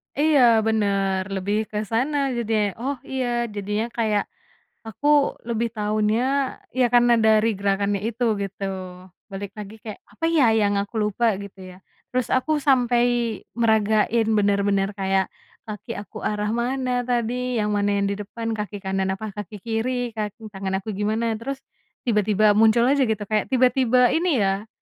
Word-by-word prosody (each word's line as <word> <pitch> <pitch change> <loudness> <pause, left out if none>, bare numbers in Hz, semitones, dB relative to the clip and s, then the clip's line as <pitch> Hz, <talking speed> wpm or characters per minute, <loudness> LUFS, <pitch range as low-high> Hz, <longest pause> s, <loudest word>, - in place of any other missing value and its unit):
Iya, 295 -1 +3 0.3
bener, 200 -3 +1
lebih 200 +2 -1
ke 210 - -4
sana 265 +6 +1 0.2
jadinya. 220 -2 +1 0.2
Oh, 270 +4 -2
iya, 260 -2 -3 0.3
jadinya 210 +2 -2
kayak 215 -3 +1 0.6
aku 225 +7 -4 0.4
lebih 235 0 0
taunya 215 +1 +1 0.6
ya 255 - +4
karena 240 0 +5
dari 220 0 +4
gerakannya 200 0 0
itu, 235 +2 -3 0.2
gitu. 195 0 -7 0.7
Balik 195 0 -6
lagi 210 0 -8
kayak, 215 -2 -7
"Apa 215 +10 -4
ya, 310 -6 +4 0.2
yang 205 -1 +2
aku 200 +3 -8
lupa?", 210 +3 0 0.2
gitu 200 -1 -12
ya, 180 - -14 0.3
terus 255 -1 0
aku 260 +4 +1 0.2
sampai 245 -3 +4 0.5
meragain 220 0 +2
benar-benar 200 -1 +2
kayak 190 0 +1 0.4
kaki 220 +1 -7
aku 215 +1 -8
arah 210 0 -2
mana 250 +2 -1 0.2
tadi, 245 +1 -1
yang 210 0 0
mana 205 0 +1
yang 200 0 +1
di - - -2
depan, 225 +2 -5
kaki 210 -2 -4
kanan 190 0 -1
apa 215 +2 -6
kaki 210 0 -8
kiri, 240 +2 -2
kaki 215 0 -6
tangan 195 -1 -3
aku 220 - -4
gimana. 215 +3 -1
Terus 275 +4 -4 0.5
tiba-tiba 210 -2 +3
muncul 220 +2 +4
aja 280 0 +2
gitu, 220 -2 -1
kayak 215 +1 -1
tiba-tiba 250 -1 +3
ini 320 - +2
ya, 195 +2 -1
215 Hz, 150 wpm, -23 LUFS, 205-240 Hz, 0.7 s, karena